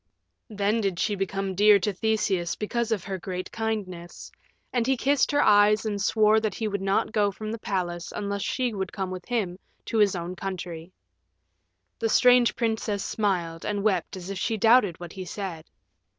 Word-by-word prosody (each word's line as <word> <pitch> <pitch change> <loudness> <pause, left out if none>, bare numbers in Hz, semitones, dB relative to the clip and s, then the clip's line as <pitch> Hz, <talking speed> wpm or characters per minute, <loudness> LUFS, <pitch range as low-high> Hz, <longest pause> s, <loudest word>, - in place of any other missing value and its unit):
Then 210 +1 0
did 195 -4 -1
she 210 - 0
become 195 0 -2
dear 205 +2 +6
to 200 +2 -1
Theseus 195 -4 0
because 235 +2 -2
of 210 -5 0
her 190 -1 -4
great 185 +1 -5
kindness, 200 -6 -5 0.4
and 240 -1 +1
he 265 -1 +2
kissed 280 +2 +2
her 290 0 +3
eyes 210 +1 +5
and 205 -2 -2
swore 215 +2 +4
that 215 -3 -2
he 220 - -2
would 200 -2 -3
not 195 +2 +1
go 210 -2 +2
from 215 +2 -6
the 225 - -5
palace 175 -4 -3
unless 200 -1 -3
she 245 +3 -1
would 190 -2 -3
come 190 -1 -4
with 185 -1 -7
him 200 -7 -2 0.3
to 225 - -1
his 205 -2 +4
own 175 +1 -4
country. 175 -3 -6 1.1
The 225 - 0
strange 245 -2 +5
princess 220 -3 -1
smiled 175 -6 -1
and 205 -1 -2
wept 190 -3 0
as 185 +1 -7
if 195 - -4
she 225 - -1
doubted 220 -5 +4
what 175 -1 -8
he 190 - -6
said. 180 -3 -6
200 Hz, 185 wpm, -26 LUFS, 185-220 Hz, 1.1 s, dear